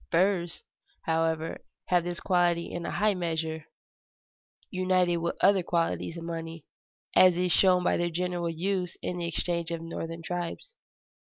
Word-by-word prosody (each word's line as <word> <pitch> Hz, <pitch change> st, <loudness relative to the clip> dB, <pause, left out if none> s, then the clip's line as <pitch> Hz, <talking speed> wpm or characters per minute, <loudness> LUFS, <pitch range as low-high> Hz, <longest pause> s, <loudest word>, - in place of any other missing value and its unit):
Furs, 175 Hz, -2 st, +1 dB, 0.4 s
however, 160 Hz, 0 st, -1 dB, 0.3 s
have 180 Hz, -2 st, +3 dB
this 175 Hz, -1 st, -3 dB
quality 175 Hz, -2 st, +1 dB
in 170 Hz, 0 st, -4 dB
a -, -, -2 dB
high 210 Hz, 0 st, +2 dB
measure, 160 Hz, -3 st, -3 dB, 1.1 s
united 185 Hz, -2 st, +2 dB
with 170 Hz, 0 st, -2 dB
other 195 Hz, 0 st, +5 dB
qualities 170 Hz, -1 st, -1 dB
of 165 Hz, -, -6 dB
money, 165 Hz, -1 st, -6 dB, 0.5 s
as 185 Hz, -2 st, +7 dB
is 180 Hz, 0 st, +1 dB
shown 180 Hz, 0 st, +5 dB
by -, -, +2 dB
their 175 Hz, 0 st, 0 dB
general 175 Hz, 0 st, -2 dB
use 180 Hz, +2 st, -2 dB
in 180 Hz, -, -3 dB
the 170 Hz, -, -2 dB
exchanges 170 Hz, 0 st, -1 dB
of 165 Hz, -, -8 dB
northern 165 Hz, 0 st, -5 dB
tribes. 175 Hz, -, -4 dB
175 Hz, 150 wpm, -28 LUFS, 165-180 Hz, 1.1 s, as